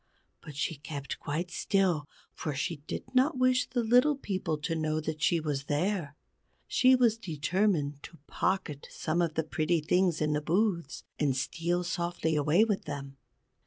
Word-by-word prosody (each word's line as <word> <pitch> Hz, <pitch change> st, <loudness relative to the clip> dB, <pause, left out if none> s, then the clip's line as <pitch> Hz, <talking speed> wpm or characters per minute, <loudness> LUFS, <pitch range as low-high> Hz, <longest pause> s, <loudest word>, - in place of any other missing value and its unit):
But 150 Hz, -, -10 dB
she 150 Hz, +2 st, -2 dB
kept 140 Hz, -1 st, -6 dB
quite 165 Hz, +4 st, -3 dB
still, 180 Hz, -7 st, +1 dB, 0.2 s
for 150 Hz, -3 st, -4 dB
she 155 Hz, +4 st, -2 dB
did -, -, -4 dB
not 260 Hz, +2 st, +3 dB
wish 255 Hz, 0 st, +3 dB
the 245 Hz, -2 st, 0 dB
Little 250 Hz, +6 st, +5 dB
People 190 Hz, -, -2 dB
to 165 Hz, +2 st, -2 dB
know 155 Hz, -1 st, 0 dB
that 155 Hz, 0 st, -4 dB
she 160 Hz, +4 st, +3 dB
was 145 Hz, -3 st, -2 dB
there. 155 Hz, 0 st, -1 dB, 0.5 s
She 260 Hz, 0 st, +5 dB
was 235 Hz, -3 st, +3 dB
determined 160 Hz, -4 st, 0 dB
to 165 Hz, -, -11 dB
pocket 180 Hz, -7 st, -2 dB
some 165 Hz, +2 st, -1 dB
of 165 Hz, -2 st, 0 dB
the 160 Hz, -, +1 dB
pretty 160 Hz, +2 st, 0 dB
things 175 Hz, +2 st, +2 dB
in 150 Hz, -1 st, +1 dB
the 150 Hz, -, 0 dB
booths, 170 Hz, -2 st, 0 dB, 0.2 s
and 140 Hz, -3 st, +1 dB
steal 170 Hz, +6 st, -1 dB
softly 170 Hz, -2 st, -1 dB
away 150 Hz, +7 st, +4 dB
with 210 Hz, -3 st, -1 dB
them. 140 Hz, -1 st, -6 dB
165 Hz, 165 wpm, -30 LUFS, 150-195 Hz, 0.5 s, Little